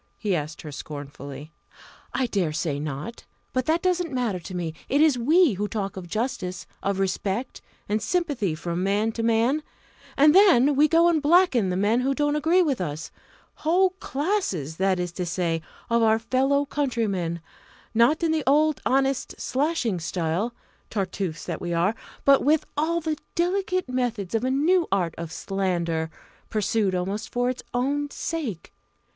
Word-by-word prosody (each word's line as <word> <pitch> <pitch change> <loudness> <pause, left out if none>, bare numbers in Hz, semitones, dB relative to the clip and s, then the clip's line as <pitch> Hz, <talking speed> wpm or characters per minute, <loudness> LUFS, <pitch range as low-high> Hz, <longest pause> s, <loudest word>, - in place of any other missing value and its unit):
he 205 -4 0
asked 155 0 -4
her 150 - -7
scornfully. 145 +1 -8 0.6
"I 265 - 0
dare 190 -9 -1
say 155 -3 -1
not. 150 +10 -5 0.3
But 255 -1 0
that 325 +2 +2
doesn't 355 -3 +1
matter 240 -8 -1
to 180 +2 -8
me! 170 -3 -3 0.2
it 280 - +2
is 310 -3 +5
we 305 - +4
who 205 +2 -2
talk 205 -2 -3
of 185 -2 -7
justice, 200 -3 -3 0.2
of 200 -1 -1
respect, 195 +5 -2 0.3
and 215 +1 0
sympathy 280 - 0
from 170 +2 -3
man 205 +3 +1
to 230 - -4
man, 230 +6 +2 0.6
and 295 +2 +6
then 315 -8 +6
we 295 +3 +5
go 335 +2 +5
and 330 -3 +3
blacken 295 - +4
the 180 - -1
men 210 +5 +2
who 270 +2 0
don't 290 0 +1
agree 330 +5 +3
with 280 - 0
us 155 -2 -4 0.5
whole 365 +4 +3
classes, 270 - -2
that 190 -1 +2
is 175 -1 -2
to 180 +1 -4
say, 170 -1 -1 0.3
of 235 0 +2
our 220 -1 +4
fellow 265 +5 +1
countrymen, 215 - -1 0.5
not 240 +9 +3
in 330 - +2
the 315 -2 0
old 300 +2 +3
honest 270 0 0
slashing 260 - 0
style, 170 +6 -1 0.4
Tartuffes 190 -5 -3
that 170 -3 -4
we 175 -1 -2
are! 175 +5 +2 0.3
but 275 -1 +6
with 305 +2 +3
all 330 +3 0
the 310 -2 -2 0.2
delicate 370 0 0
methods 240 -7 -2
of 225 +1 +1
a 255 - +1
new 325 +6 +3
art 180 -4 +1
of 170 -1 -5
slander, 170 -4 -1 0.4
pursued 210 -2 +1
almost 195 +5 -3
for 245 +1 +1
its 255 - -7
own 285 +4 0
sake. 275 - -4
230 Hz, 165 wpm, -25 LUFS, 180-290 Hz, 0.6 s, and